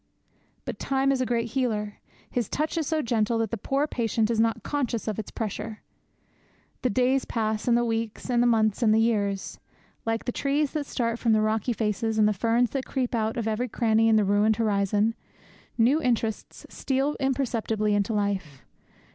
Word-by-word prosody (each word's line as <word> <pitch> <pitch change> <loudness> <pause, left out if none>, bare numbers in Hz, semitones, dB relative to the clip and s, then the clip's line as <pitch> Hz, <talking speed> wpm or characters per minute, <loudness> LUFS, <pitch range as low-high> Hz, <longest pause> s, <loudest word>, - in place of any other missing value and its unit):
But - - -5
Time 270 0 +1
is 265 -1 0
a 255 - 0
great 230 -1 0
healer. 215 -6 -1 0.3
His 240 -4 -2
touch 305 +3 -1
is 320 -4 -1
so 315 -2 0
gentle 230 -1 +1
that 225 -2 -1
the - - 0
poor 275 +7 0
patient 230 -5 0
is 225 - 0
not 225 0 +1
conscious 250 -7 -2
of 215 -1 -2
its 220 - -5
pressure. 220 0 -5 1.0
The 255 - +1
days 255 +4 +2
pass, 220 -1 -2
and 235 -1 +4
the 240 - +1
weeks, 225 -1 -3
and 245 -2 +2
the 245 - +4
months, 220 -1 +2
and 215 -2 +4
the - - +4
years. 205 -4 0 0.4
Like 225 0 -2
the 245 - -1
trees 280 +3 0
that 300 -3 -3
start 230 -1 -1
from 230 -2 +2
the 215 - +3
rocky 215 +2 0
faces, 220 0 -1
and 215 -1 +5
the 210 - +2
ferns 230 +4 +1
that 270 -2 -3
creep 255 -3 -2
out 225 -1 -1
of 230 -2 -2
every 220 +3 -1
cranny 225 -1 +2
in 220 - +5
the 215 -2 +3
ruined 205 +2 +3
horizon, 210 0 +1 0.6
new 255 +7 +4
interests 230 -4 -2
steal 275 +2 -1
imperceptibly 230 -6 0
into 205 +2 +1
life. 195 -9 -2
225 Hz, 190 wpm, -26 LUFS, 215-250 Hz, 1.0 s, and